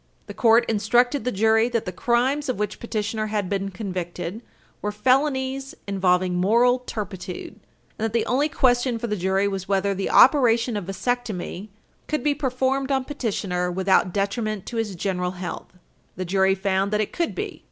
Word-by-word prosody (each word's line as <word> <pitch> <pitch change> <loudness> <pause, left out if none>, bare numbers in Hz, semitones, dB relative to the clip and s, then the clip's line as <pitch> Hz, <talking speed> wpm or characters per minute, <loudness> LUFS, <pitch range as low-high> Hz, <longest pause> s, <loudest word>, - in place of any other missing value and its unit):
The - - -8
court 230 0 +4
instructed 240 +5 +2
the 250 - +1
jury 220 +2 +3
that 230 -2 -1
the 185 - -3
crimes 255 - 0
of 255 - -1
which 210 0 -3
petitioner 215 -1 -2
had 210 -3 -1
been 195 +1 -2
convicted 180 0 -5 0.4
were 210 - -2
felonies 265 +3 0
involving 185 -2 +1
moral 235 +8 +3
turpitude, 195 -7 -6 0.4
and 220 - 0
that 225 - -1
the 230 +1 +1
only 280 +5 +1
question 245 -3 +2
for 230 - -4
the 210 -2 -1
jury 190 +1 +1
was 195 -2 -4
whether 200 0 +1
the 195 0 -2
operation 240 -4 +5
of 205 -3 -3
vasectomy 195 -1 -3 0.4
could 305 -4 -2
be 295 - +3
performed 270 0 -1
on 265 -1 +1
petitioner 195 -10 -2
without 190 0 +2
detriment 205 +1 -2
to 235 - -5
his 215 -4 -2
general 180 0 -2
health. 175 -2 -6 0.4
The 185 - -4
jury 190 +1 +2
found 195 0 0
that 210 0 +1
it 210 - -3
could 340 -1 -1
be. - - -5
215 Hz, 175 wpm, -24 LUFS, 190-245 Hz, 0.4 s, operation